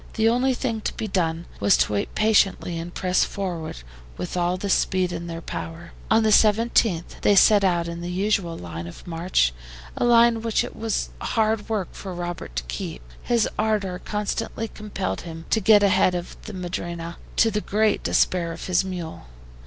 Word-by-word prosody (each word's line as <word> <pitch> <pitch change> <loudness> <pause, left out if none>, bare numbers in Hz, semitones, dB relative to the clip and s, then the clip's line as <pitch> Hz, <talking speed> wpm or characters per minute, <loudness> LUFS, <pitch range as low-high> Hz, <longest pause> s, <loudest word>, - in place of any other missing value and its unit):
The 220 0 +2
only 250 +2 +2
thing 230 -4 -2
to - - -3
be 220 - -3
done 170 -3 -1
was 100 0 +4
to - - +1
wait 100 - -2
patiently 200 -5 +2
and 170 +1 -6
press 180 0 +1
forward 175 -5 -4 0.4
with 180 - -5
all 175 0 +1
the 200 - -4
speed 185 -1 +1
in 170 0 -5
their 165 0 -6
power. 165 +1 -6 0.2
On 220 0 +4
the 215 - +3
17th 215 -4 +3
they 205 - +4
set 205 +1 +6
out 175 -3 +2
in 170 0 -5
the 175 - -4
usual 185 -2 0
line 85 -1 -7
of 85 - -11
march, 165 - +1 0.4
a - - -1
line 235 -1 +5
which 230 -1 +1
it - - -7
was 225 -1 -2
hard 220 -1 0
work 210 -5 -1
for 190 -3 -7
Robert 175 - -5
to 65 - -1
keep, - - -6 0.2
his 235 -3 +2
ardor 210 -4 0
constantly 215 +2 -3
compelled 210 -3 -4
him 165 -1 -8
to 220 - +4
get 205 0 +6
ahead 190 -2 +4
of 175 0 -5
the 215 - -7
MADRINA, 170 -2 -5 0.2
to 225 - +4
the 210 0 -1
great 215 +1 +1
despair 170 -2 +1
of - - -7
his 185 0 +2
mule. 175 - -6
185 Hz, 185 wpm, -24 LUFS, 170-215 Hz, 0.4 s, set